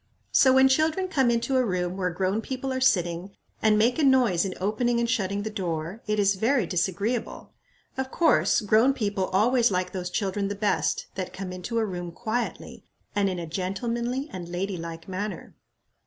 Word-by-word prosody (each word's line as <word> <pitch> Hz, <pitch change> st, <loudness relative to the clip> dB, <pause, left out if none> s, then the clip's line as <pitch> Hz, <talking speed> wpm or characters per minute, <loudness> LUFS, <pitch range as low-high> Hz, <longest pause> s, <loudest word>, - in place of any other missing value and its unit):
So, 260 Hz, -, +6 dB
when 265 Hz, 0 st, +6 dB
children 315 Hz, +7 st, +2 dB
come 270 Hz, -9 st, +2 dB
into 235 Hz, +3 st, +1 dB
a 255 Hz, -, +3 dB
room 180 Hz, -4 st, -1 dB
where 185 Hz, -1 st, -1 dB
grown 190 Hz, +4 st, -1 dB
people 260 Hz, +2 st, -4 dB
are 260 Hz, -, -2 dB
sitting, 180 Hz, -5 st, +1 dB, 0.3 s
and 215 Hz, -1 st, +4 dB
make 235 Hz, +6 st, +2 dB
a -, -, +2 dB
noise 245 Hz, -10 st, +4 dB
in 190 Hz, -, -4 dB
opening 235 Hz, +5 st, 0 dB
and 235 Hz, -, +1 dB
shutting 205 Hz, -4 st, -1 dB
the 220 Hz, -, -4 dB
door, 175 Hz, +1 st, -4 dB
it 210 Hz, 0 st, 0 dB
is 200 Hz, -1 st, +3 dB
very 225 Hz, +3 st, +1 dB
disagreeable. 190 Hz, +7 st, -2 dB, 0.4 s
Of 265 Hz, 0 st, -2 dB
course, 325 Hz, -3 st, +3 dB
grown 220 Hz, +6 st, +4 dB
people 200 Hz, -5 st, -1 dB
always 235 Hz, +6 st, +3 dB
like 180 Hz, -1 st, -1 dB
those 180 Hz, -2 st, -4 dB
children 195 Hz, +1 st, -1 dB
the 205 Hz, -, -3 dB
best 205 Hz, 0 st, 0 dB
that 185 Hz, -2 st, -5 dB
come 190 Hz, -1 st, -6 dB
into 185 Hz, +6 st, -4 dB
a 225 Hz, -, +2 dB
room 175 Hz, -3 st, -5 dB
quietly, 225 Hz, +7 st, -4 dB, 0.3 s
and 200 Hz, -1 st, +2 dB
in 185 Hz, -, -3 dB
a 170 Hz, -, -4 dB
gentlemanly 235 Hz, -, -2 dB
and 175 Hz, -2 st, -6 dB
lady 185 Hz, +2 st, -3 dB
like 165 Hz, -1 st, -7 dB
manner." 190 Hz, 0 st, -5 dB
205 Hz, 185 wpm, -26 LUFS, 185-240 Hz, 0.4 s, So